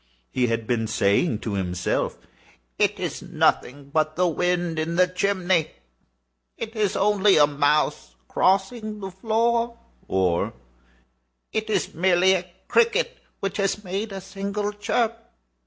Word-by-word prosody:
He 125 -1 +1
had 115 -1 -1
been 115 -1 0
saying 105 - +1
to 110 - -3
himself—"It 90 -8 -3
is - - -3
nothing 140 +2 0
but 155 0 +1
the 180 +1 +2
wind 175 0 0
in 165 +2 -2
the 180 +1 +5
chimney—it 180 -2 0 1.0
is 210 -3 0
only 205 0 +4
a 150 - +7
mouse 150 +1 0
crossing 210 +3 +1
the 195 -1 -6
floor," 230 +4 0 0.3
or 90 -3 +1 1.0
"It 220 0 -2
is 215 - 0
merely 185 +2 +4
a 180 -1 -2 0.2
cricket 480 +1 +2 0.2
which 195 -1 -2
has 200 +1 0
made 200 +3 -3
a 195 -1 -6
single 200 +2 -3
chirp." 230 +2 -1
185 Hz, 125 wpm, -24 LUFS, 145-210 Hz, 1.0 s, a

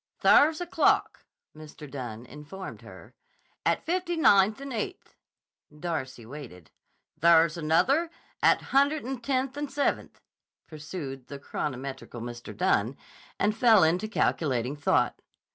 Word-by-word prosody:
"There's 310 +2 +6
a 355 - -3
clock," 345 - +1 0.3
Mr. 155 -1 -11
Dunne 125 -4 -7
informed 150 +8 -9
her, - - -14 0.5
"at - - 0
Fifty 350 0 -1
Ninth 205 -7 +4
and 275 -1 -7
Eighth." 235 - -5 0.6
Darcy 130 -8 -4
waited. 115 - -11 0.5
"There's 165 0 +5
another 205 - +2 0.3
at - - +4
a - - -12
Hundred'n 275 -2 +1
Tenth 265 +1 -1
and 290 -1 -3
Seventh," 280 +1 -2 0.5
pursued 150 -4 -8
the 140 - -7
chronometrical 135 -3 -5
Mr. 120 -3 -8
Dunne, 115 +5 +1 0.4
and 210 +1 +1
fell 225 -5 +5
into 175 +6 +2
calculating 135 - 0
thought. 145 - +1
165 Hz, 125 wpm, -27 LUFS, -, 0.6 s, There's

